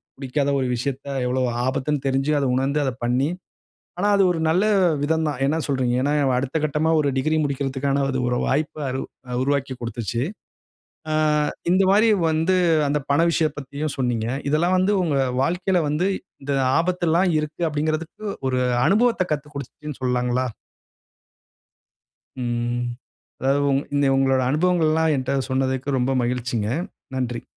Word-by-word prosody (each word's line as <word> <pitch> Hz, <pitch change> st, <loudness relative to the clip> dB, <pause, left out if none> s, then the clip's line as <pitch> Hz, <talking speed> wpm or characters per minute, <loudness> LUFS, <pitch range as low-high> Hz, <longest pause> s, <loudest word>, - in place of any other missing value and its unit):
பிடிக்காத 140 Hz, +1 st, -1 dB
ஒரு 130 Hz, -, 0 dB
விஷயத்த 135 Hz, +3 st, -4 dB, 0.2 s
எவ்ளோ 130 Hz, +1 st, 0 dB, 0.2 s
ஆபத்துன்னு 135 Hz, +2 st, -1 dB
தெரிஞ்சு, 135 Hz, +2 st, +1 dB
அத 140 Hz, -, 0 dB
உணர்ந்து 135 Hz, +3 st, +1 dB
அத 135 Hz, -, 0 dB
பண்ணி, 125 Hz, +4 st, +1 dB, 0.7 s
ஆனா 200 Hz, +3 st, +1 dB
அது 200 Hz, -, +4 dB
ஒரு 170 Hz, -, -2 dB
நல்ல 180 Hz, +5 st, +3 dB, 0.4 s
விதம் 160 Hz, +2 st, +1 dB
தான். 145 Hz, -4 st, -3 dB
என்ன 155 Hz, +4 st, +1 dB
சொல்கிறீங்க? 130 Hz, -3 st, 0 dB
ஏன்னா, 145 Hz, +2 st, +1 dB, 0.2 s
அடுத்த 135 Hz, +5 st, -1 dB
கட்டமா 155 Hz, +1 st, +1 dB
ஒரு 145 Hz, -2 st, +2 dB
டிகிரி 155 Hz, +4 st, +1 dB
முடிக்கிறதுக்கான 140 Hz, 0 st, -1 dB
இது 130 Hz, -, -1 dB
ஒரு 125 Hz, -, 0 dB
வாய்ப்ப 150 Hz, +2 st, -1 dB
அரு 130 Hz, +1 st, -2 dB, 0.3 s
அ 125 Hz, -, -2 dB
உருவாக்கிக் 135 Hz, -2 st, -1 dB
கொடுத்துச்சு. 115 Hz, 0 st, -3 dB, 0.9 s
ஆ -, -, 0 dB, 0.6 s
இந்தமாரி 195 Hz, +4 st, +4 dB, 0.2 s
வந்து 160 Hz, +4 st, +2 dB, 0.3 s
அந்த 145 Hz, +1 st, +1 dB
பண 140 Hz, +3 st, +4 dB
விஷயம் 155 Hz, -3 st, +1 dB
பத்தியும் 145 Hz, +2 st, -4 dB
சொன்னீங்க. 120 Hz, -4 st, 0 dB, 0.2 s
இதெல்லாம் 170 Hz, +5 st, +2 dB
வந்து 185 Hz, +3 st, +2 dB
உங்க 155 Hz, -5 st, 0 dB, 0.3 s
வாழ்க்கையில 180 Hz, +5 st, +1 dB
வந்து 150 Hz, +5 st, 0 dB, 0.4 s
இந்த 140 Hz, +1 st, -2 dB, 0.3 s
ஆபத்து 175 Hz, +1 st, 0 dB
எல்லாம் 175 Hz, +4 st, +3 dB
இருக்கு. 155 Hz, +2 st, -5 dB
அப்பிடிங்கிறதுக்கு 155 Hz, +6 st, -3 dB, 0.2 s
ஒரு 130 Hz, -1 st, 0 dB, 0.3 s
அனுபவத்த 230 Hz, 0 st, +3 dB
கத்துக் 150 Hz, 0 st, -4 dB
கொடுத்துச்சுன்னு 145 Hz, +1 st, -7 dB
சொல்லாங்களா? 125 Hz, 0 st, 0 dB, 2.0 s
ம். 120 Hz, 0 st, -1 dB, 0.6 s
அதாவது 135 Hz, +2 st, +2 dB
உங் 135 Hz, 0 st, +2 dB, 0.4 s
உங்களோட 135 Hz, -1 st, +3 dB
அனுபவங்கள் 165 Hz, +2 st, +2 dB
எல்லாம் 160 Hz, 0 st, +2 dB
என்ட 130 Hz, +1 st, -1 dB
சொன்னதற்கு 130 Hz, +1 st, 0 dB
ரொம்ப 125 Hz, +2 st, +1 dB
மகிழ்ச்சிங்க. 120 Hz, -3 st, -1 dB, 0.5 s
நன்றி. 120 Hz, -2 st, -3 dB
140 Hz, 140 wpm, -23 LUFS, 130-155 Hz, 2.0 s, அது